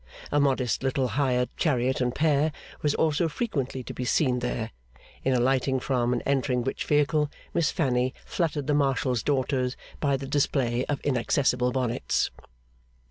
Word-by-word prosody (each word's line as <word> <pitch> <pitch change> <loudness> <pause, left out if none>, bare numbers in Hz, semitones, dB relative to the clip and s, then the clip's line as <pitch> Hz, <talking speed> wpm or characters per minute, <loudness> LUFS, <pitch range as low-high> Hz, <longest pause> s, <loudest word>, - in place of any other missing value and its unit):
A 145 - +3
modest 130 -3 +1
little 130 -1 0
hired 125 0 0
chariot 130 -4 +1
and 125 0 0
pair 155 0 +2 0.3
was 150 -1 +1
also 160 +1 +2
frequently 140 - -2
to - - -7
be 125 - -4
seen 125 0 +2
there; 120 -2 -3 0.5
in 135 - +2
alighting 130 +1 +2
from 125 -2 0
and 125 - -1
entering 130 -3 +1
which 135 - -3
vehicle, 150 0 +2 0.2
Miss 165 -3 +2
Fanny 130 -5 0
fluttered 155 -4 -1
the 150 - +1
Marshal's 135 -4 +1
daughters 130 -1 0 0.2
by 140 -2 +1
the 135 - -6
display 130 -3 +1
of 145 - -2
inaccessible 125 -1 +1
bonnets. 125 -2 0
130 Hz, 150 wpm, -27 LUFS, 125-145 Hz, 0.5 s, A